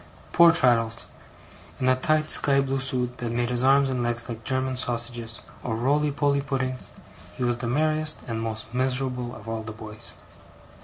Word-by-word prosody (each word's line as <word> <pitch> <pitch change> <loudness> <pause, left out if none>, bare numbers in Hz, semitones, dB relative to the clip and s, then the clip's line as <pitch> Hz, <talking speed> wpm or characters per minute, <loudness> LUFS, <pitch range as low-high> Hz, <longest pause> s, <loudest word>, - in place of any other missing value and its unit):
Poor 170 -1 +7
Traddles! 120 -7 +3 0.7
In 130 - 0
a 130 - +5
tight 155 +4 +1
sky 140 -2 +3
blue 135 0 0
suit 125 -2 -1
that 120 -1 -3
made 120 +1 0
his 120 0 +2
arms 135 +1 +5
and 130 -2 -1
legs 120 -1 0
like 115 -2 -6
German 130 0 -1
sausages, 120 -2 -3 0.2
or 115 - -2
roly 145 +6 +2
poly 140 -1 +1
puddings, 130 -2 -3 0.5
he - - -2
was 120 -1 +1
the 120 -1 -4
merriest 155 +4 0
and 115 -1 -3
most 110 0 -5
miserable 125 -1 -1
of 110 - -12
all 115 0 -3
the 110 0 -7
boys. 110 0 -6
125 Hz, 175 wpm, -25 LUFS, 115-135 Hz, 0.7 s, Poor